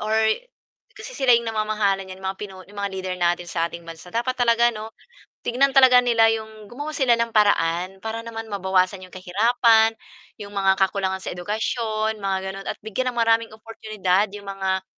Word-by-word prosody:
or 215 +1 -1 0.8
kasi - - -9
sila 260 -2 +4
'yong 235 - -2
namamahala 215 -3 0
niyan 190 0 -11
mga 190 0 -2
pinu 200 -2 -7
'yong 200 - -19
mga 200 - -1
leader 185 -1 -4
natin 175 0 +1
sa 170 -1 -1
ating 170 0 -10
bansa 165 +1 -11
dapat 235 +6 -1
talaga 240 -1 +3
ano 215 0 -7 0.6
tignan 270 +3 +2
talaga 260 -2 +7
nila 230 -2 +4
'yong 220 -1 -7
gumawa 290 +6 -6
sila 255 -5 +3
ng 230 0 -1
paraan 185 -3 +2
para 225 +1 -3
naman 225 -1 -6
mabawasan 190 -1 +1
'yong 185 - -16
kahirapan, 225 +4 +3 0.4
'yong 205 -1 -8
mga 195 -1 +2
kakulangan 190 0 -2
sa - - -4
edukasyon 215 +3 -2
mga 195 -1 -1
gano'n 195 0 -9
at - - -3
bigyan 220 +4 -2
ng - - -15
maraming 230 0 +3
oportunidad 215 -3 -1
'yong 205 0 -9
mga 190 -1 -2
215 Hz, 180 wpm, -23 LUFS, 190-230 Hz, 0.8 s, talaga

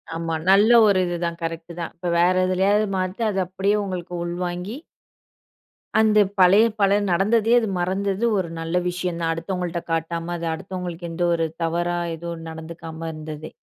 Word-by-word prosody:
ஆமா. 165 0 -2 0.2
நல்ல 205 +4 +6 0.2
ஒரு 195 -2 +4
இதுதான் 170 -1 -2
கரெக்ட்டு 165 +1 -5
தான். 170 - -4
இப்ப 175 +1 -4
வேற 180 +2 +4
எதுலயாவது 200 +3 +2
மாத்தி 185 +4 -2
அத 195 - -1
அப்படியே 195 +3 0
உங்களுக்கு 180 -2 -5
உள்வாங்கி 180 +5 -4 1.2
அந்த 215 -1 +4 0.2
பழைய 190 +4 +7 0.2
பல 200 +1 +4
நடந்ததே 215 +5 +3
அது 225 - -2
மறந்தது 195 +4 0
ஒரு 175 -3 -1
நல்ல 165 +2 -1
விஷயம் 180 -1 -3
தான். 165 0 +1
அடுத்தவங்கள்ட்ட 175 0 -3
காட்டாம, 165 +1 -2
அது 165 0 -4
அடுத்தவங்களுக்கு 175 0 -6
எந்த 175 +1 -1
ஒரு 165 -1 +1 0.2
தவறா 175 +1 0 0.2
எதுவும் 165 0 -7
நடந்துக்காம 160 0 -8
இருந்ததே. 155 0 -8
175 Hz, 150 wpm, -23 LUFS, 165-190 Hz, 1.2 s, பழைய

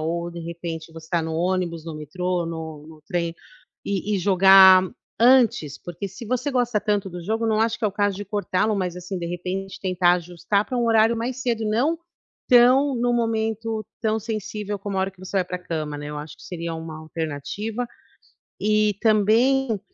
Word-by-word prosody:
ou 170 +2 -2
de 170 - -8
repente 165 -1 -6
você 160 -1 -11
está 170 -1 0
no 160 0 -4
ônibus, 175 -2 -1
no 165 -1 -6
metrô, 180 +4 -2
no 160 -2 -6
no 155 -1 -14
trem, 170 -1 -1 0.5
e 200 +1 -1
e - - -1
jogar 190 0 +8 0.4
antes, 230 - +4
porque 175 +3 -6
se 210 +5 -10
você 255 +4 -1
gosta 245 -5 +1
tanto 205 -2 0
do 175 -1 -8
jogo, 225 +3 -1
não 220 -1 +2
acho 230 +1 +1
que 225 - -4
é - - +4
o 195 - -9
caso 205 -2 0
de 205 - -5
cortá-lo, 205 +1 0
mas 180 -3 -2
assim, 180 +2 -5
de 170 - -4
repente, 185 +3 -5
tentar 180 -2 +3
ajustar 180 +3 -1
para 255 - -4
um 240 - +1
horário 225 0 +4
mais 245 +3 -3
cedo, 230 -3 -1
não 260 +10 +1 0.5
tão 255 +3 +6
no 240 0 +1
momento 225 -1 -1 0.2
tão 220 -1 +1
sensível 210 -1 -4
como 200 -1 -4
a - - +2
hora 190 +1 0
que 185 - -21
você 195 - -4
vai 185 - +1
para 180 0 -5
cama, 155 -4 -4
né. 145 0 -7
Eu 150 - -5
acho 150 0 -9
que - - -17
seria 170 -2 -5
uma 160 -1 -7
alternativa. 165 - -4 0.7
E 210 0 +2
também 225 +3 +3
195 Hz, 195 wpm, -23 LUFS, 170-220 Hz, 0.7 s, jogar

